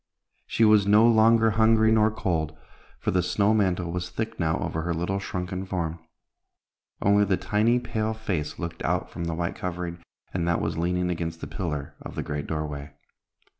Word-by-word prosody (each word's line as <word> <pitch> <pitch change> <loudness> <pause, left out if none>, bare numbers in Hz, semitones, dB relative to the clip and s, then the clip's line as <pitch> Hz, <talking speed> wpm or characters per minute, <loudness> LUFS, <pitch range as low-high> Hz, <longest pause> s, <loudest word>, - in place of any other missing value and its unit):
She 115 - +3
was 105 -2 +5
no 105 +3 +6
longer 115 0 +5
hungry 110 0 +4
nor 110 -1 +4
cold, 80 -8 -2 0.4
for - - -1
the 90 - +2
snow 100 +4 +2
mantle 90 -5 +1
was 90 0 -3
thick 110 0 -4
now 80 -2 +1
over 80 - -2
her 85 +1 -2
little 90 +4 -1
shrunken 95 0 -4
form. 85 -3 -3 1.0
Only 100 +1 +5
the 95 -2 +1
tiny 105 +6 +2
pale 110 -2 -2
face 95 -9 -3
looked 85 -1 -5
out - - -1
from 85 - -5
the 85 -1 -2
white 85 +1 -2
covering, 90 -1 -5 0.3
and 85 -2 -1
that 85 - +2
was - - -2
leaning 90 +2 0
against 85 -1 -3
the - - -5
pillar 75 -6 -4
of - - -8
the - - -2
great 75 -1 -4
doorway. 75 -2 -4
90 Hz, 180 wpm, -26 LUFS, 85-110 Hz, 1.0 s, no